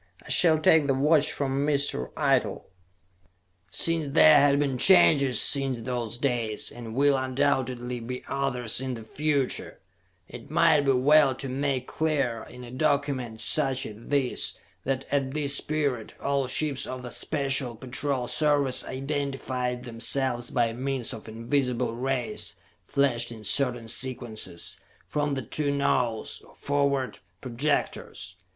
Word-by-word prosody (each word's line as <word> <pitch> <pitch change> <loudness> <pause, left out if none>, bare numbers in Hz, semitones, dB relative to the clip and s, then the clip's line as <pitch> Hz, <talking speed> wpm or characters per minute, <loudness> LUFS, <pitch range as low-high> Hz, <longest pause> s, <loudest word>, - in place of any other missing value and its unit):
I - - -12
shall 160 -3 +4
take 155 -1 +4
the 135 - +2
watch 150 +2 +3
from 135 0 -1
Mr. 140 - -1
Eitel." - - +1 1.1
Since 160 - +2
there 155 -1 +7
have 140 0 +4
been 140 -3 -1
changes 140 - +5
since 135 -4 0
those 120 -1 -3
days, 120 -5 -1
and 115 -2 -9
will 140 +1 +3
undoubtedly 130 -2 -1
be 125 +2 -6
others 130 -4 -1
in 130 -1 -3
the 115 - -9
future, 140 +3 -2 0.5
it - - -11
might 160 -3 +4
be 135 - +4
well 140 +1 +4
to 135 - -5
make 135 -1 -2
clear, 140 -9 -1
in 125 0 -11
a 120 - -10
document 135 -5 -1
such 135 -4 +1
is 110 +2 -10
this, 140 -3 0 0.3
that 135 0 -2
at 140 -1 -1
this 140 -2 +4
period, 145 -7 -2
all 140 -1 -1
ships 140 +1 0
of 130 -1 -6
the 125 - -7
Special 135 -4 0
Patrol 130 +1 -2
Service 145 -3 +1
identified 130 -2 -3
themselves 120 +1 0
by 120 -3 0
means 130 -1 -2
of 110 - -10
invisible 120 +1 -1
rays 125 -3 -2 0.3
flashed 125 -4 0
in 110 -2 -10
certain 120 0 +1
sequences, 115 -8 -3 0.3
from 145 -1 -1
the 135 - -4
two 145 +6 -2
nose, 125 -5 -1
or - - -20
forward, 140 -2 -1 0.2
projectors. 120 - -3
130 Hz, 140 wpm, -26 LUFS, 120-140 Hz, 1.1 s, there